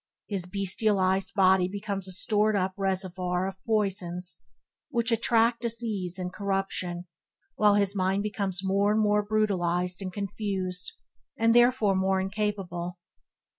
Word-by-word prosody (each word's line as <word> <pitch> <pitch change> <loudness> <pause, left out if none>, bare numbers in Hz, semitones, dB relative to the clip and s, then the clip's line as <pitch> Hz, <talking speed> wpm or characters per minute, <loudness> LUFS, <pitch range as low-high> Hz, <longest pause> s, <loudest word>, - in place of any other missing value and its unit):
His 190 -4 -3
bestialized 195 0 +1
body 190 -2 +4
becomes 200 0 -4
a - - -6
stored 210 +3 +1
up 190 -1 0
reservoir 185 -2 -1
of 190 0 -8
poisons, 185 -5 -1 0.5
which 235 -3 0
attract 230 +1 +3
disease 220 -6 -1
and 180 -1 -4
corruption, 195 -3 -2 0.5
while 210 -1 +4
his 200 -1 +4
mind 190 +1 0
becomes 195 -3 -1
more 200 +2 +2
and 215 - +2
more 210 -1 +3
brutalized 185 -4 0
and 185 -1 -4
confused, 190 -2 -4 0.4
and 230 0 +3
therefore 240 -4 +4
more 190 0 +1
incapable. 190 -3 -3
195 Hz, 130 wpm, -27 LUFS, 185-210 Hz, 0.5 s, body